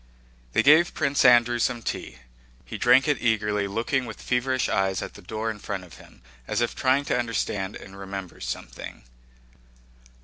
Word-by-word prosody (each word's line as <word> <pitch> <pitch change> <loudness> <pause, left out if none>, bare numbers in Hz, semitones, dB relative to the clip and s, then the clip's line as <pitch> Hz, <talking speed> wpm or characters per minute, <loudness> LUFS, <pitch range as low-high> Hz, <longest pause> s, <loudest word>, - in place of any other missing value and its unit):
They - - +3
gave 155 +5 +5
Prince 140 -3 +1
Andrew 120 -1 +5
some 120 0 0
tea. 65 - -5 0.5
He - - -7
drank 135 +3 +5
it 145 -4 +1
eagerly, 105 -3 +1
looking 120 +6 -1
with 110 - -8
feverish 130 +1 0
eyes 95 -2 0
at - - -7
the - - -13
door 110 +4 -3
in 105 - -9
front 100 -2 -5
of 85 -4 -14
him 60 - -18 0.2
as - - -1
if 120 -1 0
trying 135 +2 +2
to 125 - 0
understand 105 -4 -2
and 95 - -11
remember 95 -2 -7
something. - - -7
115 Hz, 170 wpm, -25 LUFS, 100-130 Hz, 0.5 s, gave